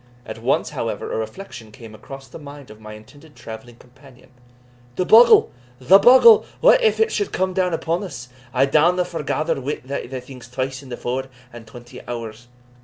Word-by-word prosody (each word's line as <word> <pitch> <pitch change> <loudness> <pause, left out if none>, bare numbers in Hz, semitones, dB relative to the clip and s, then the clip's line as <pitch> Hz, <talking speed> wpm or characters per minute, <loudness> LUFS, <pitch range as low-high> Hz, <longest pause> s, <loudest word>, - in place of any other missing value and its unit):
At - - -9
once, - - -1
however, - - -5
a - - -2
reflection 110 - -8
came 110 0 -13
across 135 +5 -12
the 125 - -12
mind 145 -4 -12
of 110 0 -16
my 110 0 -10
intended 145 +8 -17
travelling 115 +2 -11
companion. 130 +1 -20 0.6
"The 185 - -1
bogle! 230 +3 +6 0.3
the 180 +10 +5
bogle! 425 - +7 0.2
what - - +5
if 450 -2 +1
it 445 0 +2
should 410 - -2
come 185 0 -1
out 180 -1 0
upon 165 +3 -3
us? 145 -10 -9 0.2
I 130 +1 +2
downa 170 +6 +2
forgather 160 -2 -3
wi' 140 +3 -3
thae 140 +2 -5
things 125 -1 -13
twice 130 +1 -5
in 135 - -14
the 120 - -7
four 130 +2 -4 0.3
and 115 -1 -12
twenty 120 +2 -13
hours." 120 -1 -8
135 Hz, 180 wpm, -20 LUFS, 120-180 Hz, 0.6 s, bogle